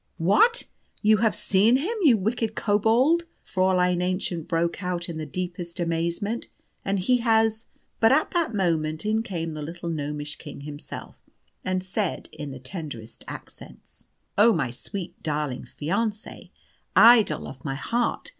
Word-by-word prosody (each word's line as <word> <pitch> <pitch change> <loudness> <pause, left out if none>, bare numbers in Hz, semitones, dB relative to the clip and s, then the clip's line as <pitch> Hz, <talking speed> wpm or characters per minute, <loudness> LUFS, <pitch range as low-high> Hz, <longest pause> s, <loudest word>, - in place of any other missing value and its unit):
"What, 205 - +4 0.4
you 215 +1 +6
have 220 0 +2
seen 210 +6 +4
him, 365 - -2
the 275 -8 +7
wicked 220 +2 -1
Cobold?" 230 +11 +3 0.2
Fräulein 180 -1 +2
Aennchen 180 -2 -2
broke 170 +1 0
out 180 -2 -2
in 165 -2 -5
the 155 - -4
deepest 175 +1 -5
amazement. 170 +6 -1 0.4
"And 195 0 0
he 225 +7 +3
has 225 -1 +2 0.2
" - - -46
But 225 - +5
at 305 +4 +3
that 340 -5 +1
moment 165 -5 0
in 215 +1 +2
came 165 -7 -4
the 155 - -6
little 170 +3 -5
gnomish 150 -1 -4
King 145 -3 -9
himself, 145 0 -9 0.3
and 185 0 -1
said, 190 0 -2
in 145 -1 -7
the 135 - -7
tenderest 130 - -8
accents, - - -11 0.3
"Oh, 225 +2 +7
my 140 -8 -1
sweet, 180 +8 -7
darling 150 -4 -2
fiancée! 205 +7 -3 0.5
Idol 230 -2 +6
of 130 -2 -10
my 135 -2 -2
heart! 235 - -1
185 Hz, 150 wpm, -25 LUFS, 160-220 Hz, 0.5 s, the